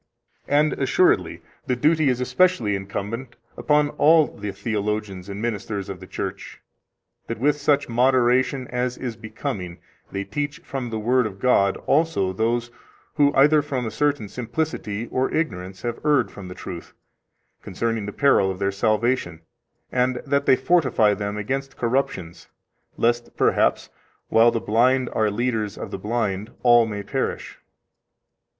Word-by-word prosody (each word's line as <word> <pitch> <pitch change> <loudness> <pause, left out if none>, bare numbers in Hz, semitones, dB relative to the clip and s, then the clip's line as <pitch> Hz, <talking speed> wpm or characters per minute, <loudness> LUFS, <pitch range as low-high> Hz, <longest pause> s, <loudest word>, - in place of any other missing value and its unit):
And 150 +2 +3
assuredly, 135 +7 +1 0.2
the 125 - +1
duty 155 +3 +3
is 125 -1 0
especially 125 - +2
incumbent 105 +6 -5 0.2
upon 150 -1 +2
all 160 +1 +6
the 100 0 -5
theologians 105 -2 -3
and 100 0 -6
ministers 105 -3 -3
of 95 -2 -6
the 95 - -11
Church, - - -6 0.7
that 115 - -4
with 145 +6 +2
such 145 -2 +2
moderation 125 +1 +2
as 125 0 -2
is 120 -3 -5
becoming 110 -5 -5 0.3
they 100 - -3
teach 145 +9 -3
from 130 -6 -5
the 110 - -3
Word 120 +2 +2
of 95 -2 -9
God 100 -6 +3
also 145 - +1
those 120 +3 -1 0.5
who 145 -1 +5
either 150 +3 +5
from 135 -4 -3
a 110 - -3
certain 145 -6 0
simplicity 115 -3 -3
or 130 +1 0
ignorance 95 - -3
have 120 -1 -4
erred 145 -5 +2
from 100 -3 -9
the 90 - -8
truth, 90 -2 -8 0.7
concerning 115 +2 -3
the - - -4
peril 135 -7 +3
of 95 - -4
their 100 0 0
salvation, 110 -3 0 0.5
and 125 0 +1
that 140 0 0
they - - +7
fortify 130 -8 +3
them 100 +1 -4
against 135 +6 -3
corruptions 115 -9 -2 0.5
lest 120 0 0
perhaps, - - +2 0.4
while 115 +1 +6
the 115 - -1
blind 125 +4 +2
are 110 -1 +2
leaders 110 -2 -2
of - - -7
the - - -5
blind, 105 -1 -2
all 120 -2 +6
may 105 -2 -5
perish. - - -3
120 Hz, 150 wpm, -23 LUFS, 105-135 Hz, 0.7 s, they